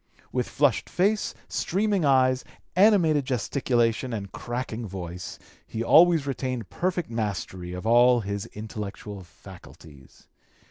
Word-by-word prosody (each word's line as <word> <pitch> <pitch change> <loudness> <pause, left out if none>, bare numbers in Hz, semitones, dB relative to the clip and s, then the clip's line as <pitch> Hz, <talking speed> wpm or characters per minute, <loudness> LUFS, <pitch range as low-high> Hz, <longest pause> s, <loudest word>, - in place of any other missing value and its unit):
With 125 -1 -1
flushed 145 -6 +1
face, 205 +3 0
streaming 200 -2 0
eyes, 130 -2 +3 0.3
animated 180 -7 +4
gesticulation, 125 -1 0
and 100 -3 -5
cracking 120 -1 -5
voice, 90 -2 -7 0.3
he 115 - -3
always 165 +2 +6
retained 130 -7 -3
perfect 175 -7 -2
mastery 95 -5 -4
of 90 +3 -6
all 120 +1 +5
his 100 -1 -4
intellectual 105 -1 -7
faculties. 75 -4 -15
120 Hz, 110 wpm, -26 LUFS, 100-145 Hz, 0.3 s, always